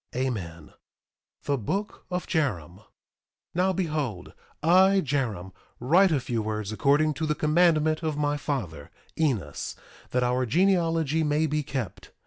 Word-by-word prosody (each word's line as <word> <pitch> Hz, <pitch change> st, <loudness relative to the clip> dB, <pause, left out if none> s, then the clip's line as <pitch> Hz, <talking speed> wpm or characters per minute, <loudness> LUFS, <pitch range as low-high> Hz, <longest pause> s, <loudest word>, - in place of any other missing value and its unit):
Amen. 100 Hz, -11 st, -4 dB, 0.7 s
THE 140 Hz, -2 st, 0 dB
BOOK 195 Hz, -, -4 dB
OF 180 Hz, 0 st, -3 dB
JAROM 95 Hz, -, -1 dB
1:1 110 Hz, -, -21 dB, 0.7 s
Now 185 Hz, +2 st, +2 dB
behold, 150 Hz, -, -3 dB, 0.3 s
I, 190 Hz, +4 st, +5 dB
Jarom, 115 Hz, -10 st, -2 dB, 0.3 s
write 175 Hz, +10 st, +4 dB
a 150 Hz, -, +2 dB
few 120 Hz, -2 st, -2 dB
words 110 Hz, -1 st, -3 dB
according 145 Hz, +7 st, +2 dB
to 155 Hz, +2 st, -3 dB
the 150 Hz, -, 0 dB
commandment 155 Hz, 0 st, +3 dB
of 155 Hz, -3 st, -2 dB
my 145 Hz, 0 st, +1 dB
father, 100 Hz, -, -4 dB, 0.3 s
Enos, 115 Hz, -, -1 dB, 0.3 s
that 125 Hz, 0 st, +1 dB
our 125 Hz, +1 st, +1 dB
genealogy 165 Hz, -, +2 dB
may 150 Hz, +1 st, +1 dB
be 150 Hz, 0 st, 0 dB
kept. 135 Hz, -6 st, -5 dB
145 Hz, 135 wpm, -26 LUFS, 115-160 Hz, 0.7 s, I